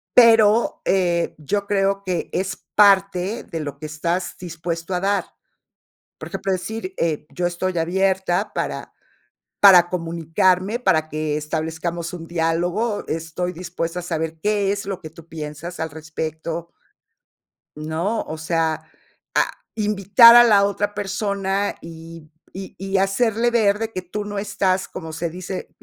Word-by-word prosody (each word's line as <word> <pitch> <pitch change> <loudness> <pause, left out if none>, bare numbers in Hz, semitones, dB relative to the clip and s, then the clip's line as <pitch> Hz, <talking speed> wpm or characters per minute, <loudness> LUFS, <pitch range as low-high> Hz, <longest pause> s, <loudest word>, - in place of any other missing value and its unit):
pero, 225 -2 +5
eh, 175 -3 +1
yo 200 +7 -2
creo 195 0 +1
que 185 -3 -2
es 185 -1 -3
parte 195 +1 +4
de 165 - -6
lo 145 -2 -5
que 155 - -7
estás 170 +4 -2
dispuesto 170 0 -5
a 180 - +1
dar. 200 +1 0 0.9
Por - - -8
ejemplo, 195 - -2
decir, 220 - -4
eh: 155 -2 -1
"yo 175 - -1
estoy 175 +1 -2
abierta 190 +3 0
para - - -4 0.7
para 180 -3 +8
comunicarme, 180 +4 +1
para 155 -8 +2
que 155 -1 -2
establezcamos 160 +3 -3
un 165 -2 -8
diálogo, 175 +6 -1
estoy 165 +3 -3
dispuesta 170 0 -4
a - - -4
saber 160 -2 -3
qué 205 -1 +1
es 200 -1 -4
lo 195 -2 -4
que 155 - -8
tú 165 +1 -15
piensas 155 +2 -7
al 160 - -2
respecto". 160 +2 -5 1.1
¿No? 160 +8 -2
O 155 - -6
sea, 160 0 -1 0.5
a - - +3 0.2
invitar 210 +2 +7
a 240 - +10
la 205 -4 +5
otra 205 +1 -1
persona, 200 0 -1
y 165 -1 -11 0.2
y 190 +1 -8
y 195 +1 -1
hacerle 225 +4 +2
ver 210 -4 +3
de 225 0 -3
que 185 - -3
tú 205 +4 -5
no 205 -1 -4
estás 195 -2 0
como 160 -3 -8
se 165 +1 -2
dice 185 +2 -6
180 Hz, 145 wpm, -22 LUFS, 165-200 Hz, 1.1 s, a